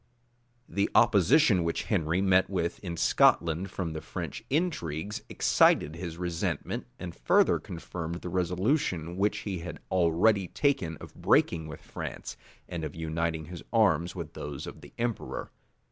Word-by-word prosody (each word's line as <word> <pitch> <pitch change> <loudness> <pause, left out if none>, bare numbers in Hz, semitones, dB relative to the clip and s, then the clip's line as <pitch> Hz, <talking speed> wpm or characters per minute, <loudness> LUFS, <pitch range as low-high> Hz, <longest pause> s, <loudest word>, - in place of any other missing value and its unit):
[*] 120 - -41 0.2
The 100 +1 0
opposition 105 - +5
which 85 0 -1
Henry 85 -3 0
met 95 -1 +4
with 85 -3 -2
in 85 -3 -5
Scotland 85 +3 +3
from 90 -3 -4
the 80 - -5
French - - -6
intrigues, 105 - -1
excited 75 +2 +3
his 85 -1 -6
resentment, 85 -2 -3
and 85 -1 -6
further - - +3
confirmed 85 0 -6
the 90 - -5
resolution 90 - 0
which 100 +3 0
he 95 -4 -3
had 85 +1 -6
already 95 +3 +3
taken 95 - 0
of - - -11
breaking 80 -2 +2
with 75 - -9
France, - - -6 0.3
and 85 -2 -5
of 75 - -5
uniting 80 0 -2
his 85 +1 -8
arms 100 -6 +3
with 85 -3 -6
those 70 0 -6
of - - -9
the - - -13
emperor. 120 -1 -3
85 Hz, 150 wpm, -29 LUFS, 80-100 Hz, 0.3 s, opposition